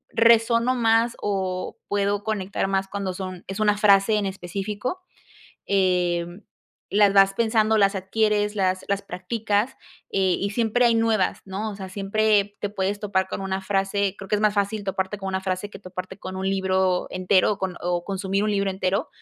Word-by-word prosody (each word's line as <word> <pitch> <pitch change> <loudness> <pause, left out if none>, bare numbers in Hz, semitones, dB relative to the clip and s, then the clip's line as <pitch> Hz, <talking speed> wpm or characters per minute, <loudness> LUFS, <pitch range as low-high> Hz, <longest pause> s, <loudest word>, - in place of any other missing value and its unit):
resueno 230 +2 +4
más 230 0 +2
o 190 -2 -2
puedo 205 0 0
conectar 200 -3 -2
más 195 0 0
cuando 195 -2 -3
son 185 -1 -6
es 195 +2 -5
una 210 -1 +3
frase 200 +1 +5
en 205 - 0
específico, 200 - -4 0.6
em, 180 -1 0 0.5
las 205 -1 +4
vas 195 0 +5
pensando, 220 0 +2
las 200 -1 +3
adquieres, 210 +2 0
las 185 -1 0
las 200 0 0
practicas, 205 +5 -1 0.4
eh, 190 -2 +2
y 200 - -1
siempre 235 +2 +1
hay 235 - +4
nuevas, 225 -4 +1
¿no? 205 +3 -4
O - - -8
sea, 190 -1 -6
siempre 205 +1 +1
te 205 - -2
puedes 200 0 -2
topar 195 -2 0
con - - -4
una 195 0 -2
frase 195 0 0
creo 195 - -9
que 210 - +1
es 205 - -2
más 210 -1 +3
fácil 205 +1 -1
toparte 195 +1 -2
con 195 - -6
una 190 - -1
frase 190 +2 -3
que - - -11
toparte 185 0 -8
con 185 0 -7
un 190 0 -2
libro 190 -1 +1
entero 185 +2 +2
o 205 - -10
con 190 -2 -4
o 175 0 -1
consumir 195 +1 -1
un 215 - +1
libro 200 -1 +1
entero, 190 0 -1
200 Hz, 185 wpm, -24 LUFS, 190-210 Hz, 0.6 s, frase